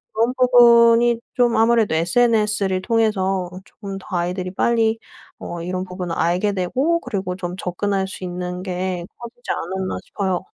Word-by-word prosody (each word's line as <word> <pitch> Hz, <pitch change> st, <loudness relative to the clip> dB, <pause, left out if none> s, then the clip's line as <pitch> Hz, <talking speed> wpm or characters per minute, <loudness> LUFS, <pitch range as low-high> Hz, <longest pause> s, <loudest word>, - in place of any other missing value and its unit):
그런 230 Hz, +3 st, +2 dB
부분이 235 Hz, -1 st, +5 dB, 0.2 s
좀 240 Hz, -2 st, +2 dB
아무래도 225 Hz, -5 st, +3 dB
SNS를 210 Hz, +1 st, +2 dB
통해서 195 Hz, -5 st, 0 dB, 0.2 s
쪼끔 200 Hz, -3 st, -8 dB
더 -, -, -16 dB
아이들이 180 Hz, +1 st, -2 dB
빨리 225 Hz, +2 st, +1 dB, 0.4 s
어 170 Hz, -1 st, -6 dB
이런 185 Hz, +1 st, -3 dB
부분을 180 Hz, -2 st, -5 dB
알게 180 Hz, +5 st, +1 dB
되고 260 Hz, -, 0 dB
그리고 190 Hz, -3 st, -4 dB
좀 180 Hz, -1 st, -5 dB
접근할 195 Hz, +1 st, -2 dB
수 190 Hz, -, -8 dB
있는 180 Hz, 0 st, -5 dB
게 180 Hz, -1 st, -3 dB
커지지 240 Hz, +1 st, -11 dB
않았나 190 Hz, +2 st, -3 dB
싶어요. 190 Hz, -3 st, -2 dB
195 Hz, 315 characters per minute, -21 LUFS, 180-230 Hz, 0.4 s, 부분이